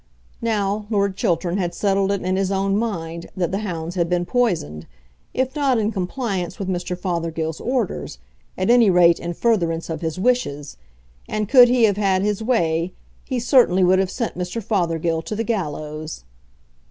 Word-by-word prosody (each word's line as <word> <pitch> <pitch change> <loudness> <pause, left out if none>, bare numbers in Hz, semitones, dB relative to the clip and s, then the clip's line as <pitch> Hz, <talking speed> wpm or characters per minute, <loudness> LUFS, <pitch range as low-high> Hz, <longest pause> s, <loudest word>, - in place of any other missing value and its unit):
Now, 210 -2 -1
Lord 200 -3 +1
Chiltern 175 0 0
had 175 -2 -2
settled 195 -1 +1
it 200 - -2
in 185 +1 0
his 195 0 0
own 195 0 +1
mind 170 -7 -3
that 175 -1 0
the 195 - -1
hounds 170 -5 -4
had 170 -2 0
been 175 0 0
poisoned, 175 - -1 0.4
if 260 +1 -1
not 275 -4 +2
in 215 0 0
compliance 190 -3 -3
with 195 - -4
Mr. 180 -1 -2
Fothergill's 165 -3 -3
orders, 240 - -2 0.4
at 190 +4 +2
any 240 -4 +6
rate 175 -2 +5
in 175 0 -5
furtherance 170 -8 0
of 160 - -4
his 160 -1 -3
wishes, 185 - 0 0.5
and, 215 -1 -1
could 250 +1 +8
he 245 -1 +3
have 205 -3 +4
had 195 -2 +2
his 210 0 0
way, 175 -7 0 0.3
he 255 -3 -2
certainly 235 -7 +4
would 185 +1 +4
have 190 -1 +1
sent 230 +3 -3
Mr. 180 +5 -3
Fothergill 170 -6 0
to 215 - -5
the 225 - -1
gallows. 155 - -4
190 Hz, 175 wpm, -21 LUFS, 170-215 Hz, 0.5 s, could